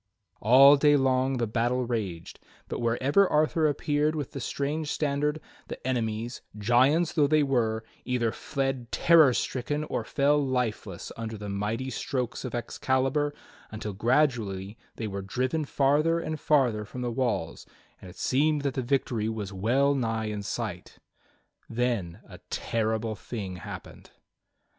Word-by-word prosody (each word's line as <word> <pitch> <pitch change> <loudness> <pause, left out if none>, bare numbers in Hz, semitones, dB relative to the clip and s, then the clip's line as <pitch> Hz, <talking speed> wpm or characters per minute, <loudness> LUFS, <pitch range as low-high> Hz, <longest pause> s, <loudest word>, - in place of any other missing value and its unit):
All 135 +6 +8
day 145 +1 +5
long 130 0 +2
the 120 - 0
battle 120 +3 0
raged, 100 -9 -4 0.3
but - - -4
wherever 130 +11 +3
Arthur 155 0 +2
appeared 150 +1 0
with 145 -4 -4
the 135 - -6
strange 145 +4 -2
standard, 150 +1 0 0.3
the - - -6
enemies, 120 -2 -2 0.2
giants 130 +10 +3
though 150 -4 +3
they 155 0 +3
were, 115 -5 0 0.2
either 120 -3 0
fled 135 -2 -3
terror 165 -5 +6
stricken 135 +4 -2
or - - -3
fell 145 +1 +2
lifeless 125 -4 -2
under 115 -1 -5
the 105 0 -6
mighty 110 +6 -2
strokes 125 0 -3
of 125 -2 -4
Excalibur, 135 +4 0 0.4
until 110 -1 -5
gradually 110 -4 0 0.2
they 115 - -4
were 100 -2 -4
driven 130 +10 -1
farther 150 +5 +2
and 155 -2 -4
farther 125 -9 +2
from 125 +4 -8
the 120 -1 -2
walls, 115 -9 -2 0.3
and 95 - -10
it - - -14
seemed 145 +2 +1
that 140 -2 0
the 130 - -2
victory 120 -4 0
was 105 -3 -5
well 125 +9 +2
nigh 115 -4 -1
in 105 -1 -3
sight. 100 -3 -5 0.7
Then 115 -7 -1
a - - -12
terrible 110 0 -1
thing 100 -3 -6
happened. 85 - -9
125 Hz, 145 wpm, -27 LUFS, 110-140 Hz, 0.7 s, All